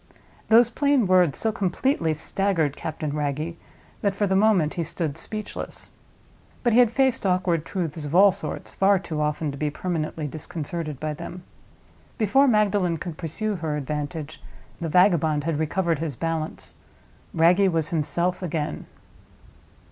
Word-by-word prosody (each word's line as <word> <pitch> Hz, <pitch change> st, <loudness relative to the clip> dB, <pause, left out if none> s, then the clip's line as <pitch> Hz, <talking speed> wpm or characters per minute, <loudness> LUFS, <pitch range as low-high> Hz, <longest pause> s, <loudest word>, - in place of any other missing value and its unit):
Those 235 Hz, +1 st, +6 dB
plain 280 Hz, -3 st, +2 dB
words 180 Hz, -5 st, +4 dB
so 220 Hz, -, 0 dB
completely 190 Hz, -, 0 dB
staggered 160 Hz, -2 st, 0 dB
Captain 155 Hz, -2 st, -4 dB
Wragge 150 Hz, +3 st, -2 dB, 0.5 s
that 200 Hz, -1 st, 0 dB
for 205 Hz, -, +1 dB
the 190 Hz, -1 st, +1 dB
moment 195 Hz, -6 st, +3 dB
he 170 Hz, -, -2 dB
stood 155 Hz, -2 st, -3 dB
speechless. 215 Hz, -1 st, -4 dB, 0.7 s
But 240 Hz, -2 st, +3 dB
he 240 Hz, -, +6 dB
had 245 Hz, -2 st, +6 dB
faced 265 Hz, +1 st, +1 dB
awkward 180 Hz, -4 st, +1 dB
truths 165 Hz, -5 st, -3 dB
of 145 Hz, +2 st, -4 dB
all 200 Hz, +2 st, +8 dB
sorts 195 Hz, -, -6 dB
far 195 Hz, +1 st, +4 dB
too 160 Hz, -4 st, -4 dB
often 150 Hz, 0 st, -1 dB
to 140 Hz, -, -9 dB
be 150 Hz, -, 0 dB
permanently 160 Hz, -1 st, -3 dB
disconcerted 155 Hz, 0 st, -5 dB
by 155 Hz, 0 st, -2 dB
them. 175 Hz, +4 st, -8 dB, 0.7 s
Before 255 Hz, +5 st, +4 dB
Magdalen 205 Hz, -7 st, +2 dB
could 170 Hz, 0 st, -6 dB
pursue 195 Hz, +5 st, -3 dB
her 155 Hz, -3 st, -2 dB
advantage, 150 Hz, +2 st, -5 dB, 0.4 s
the 165 Hz, -2 st, -3 dB
vagabond 160 Hz, -4 st, +3 dB
had 160 Hz, -1 st, -1 dB
recovered 165 Hz, 0 st, 0 dB
his 160 Hz, -5 st, -3 dB
balance: 165 Hz, +2 st, -3 dB, 0.6 s
Wragge 175 Hz, +4 st, +4 dB
was 160 Hz, -2 st, 0 dB
himself 170 Hz, +3 st, -1 dB
again. 160 Hz, -4 st, -3 dB
170 Hz, 150 wpm, -24 LUFS, 155-195 Hz, 0.7 s, all